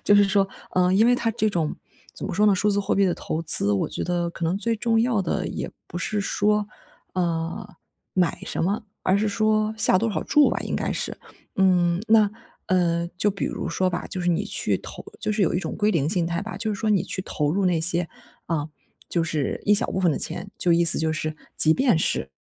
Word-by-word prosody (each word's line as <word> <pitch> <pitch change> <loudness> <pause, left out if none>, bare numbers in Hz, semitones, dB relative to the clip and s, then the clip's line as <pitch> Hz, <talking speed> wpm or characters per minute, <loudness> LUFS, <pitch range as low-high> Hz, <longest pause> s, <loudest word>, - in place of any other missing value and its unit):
就 205 - +5
是 205 - +6
说， 195 0 +2 0.3
嗯， 180 0 +3
因 220 +4 +5
为 245 - +5
它 235 -2 0
这 220 -1 0
种 170 -6 -1 0.4
怎 - - -6
么 - - -4
说 210 - +3
呢， 205 -2 +5
数 210 +3 +1
字 205 0 +1
货 200 - 0
币 195 -1 +3
的 175 - +1
投 160 - -4
资， 150 -10 +1
我 100 - 0
觉 - - -4
得 175 -1 -1
可 170 - -5
能 175 +4 0
最 230 +2 -1
重 225 +1 +1
要 230 -4 +1
的 175 - -2
也 - - -5 0.2
不 - - -8
是 205 +4 -1
说， 210 +1 +1 0.5
呃， 170 +1 -2 0.4
买 180 -2 +1
什 - - -3
么， 205 +6 0 0.2
而 185 - +3
是 210 +2 +1
说 215 +1 +1
下 185 - +4
多 225 +4 0
少 - - -2
注 295 -1 +4
吧 - - -1
应 - - -3
该 - - -2
是， - - -3 0.4
嗯。 180 -1 +3
那， 215 -2 +5 0.4
呃， 170 -2 +1
就 205 - +3
比 195 - -4
如 - - -4
说 185 - 0
吧， 175 - -4
就 185 - -4
是 175 - -1
你 175 +4 0
去 210 - -1
投 - - -10 0.2
就 - - -1
是 210 - -2
有 170 - +1
一 - - +2
种 190 - -4
归 210 0 +2
零 150 -6 +1
心 175 -2 +1
态 170 +2 -2
吧， 220 - -6
就 220 -2 -2
是 - - -8
说 220 -1 +1
你 195 -4 +3
去 185 - -4
投 150 -5 -1
入 195 +1 0
那 175 -3 +1
些， 170 +1 +3 0.4
啊， 155 -2 -2 0.4
就 170 - 0
是 155 -4 -2
一 205 - +4
小 235 - +2
部 - - -2
分 180 -3 +3
的 - - -2
钱， 200 - -3
就 175 - +2
意 170 +1 +4
思 170 - +5
就 160 0 0
是 155 0 -3 0.2
即 155 - +5
便 250 -10 +3
是 65 - 0
185 Hz, 260 characters per minute, -24 LUFS, 170-210 Hz, 0.5 s, 是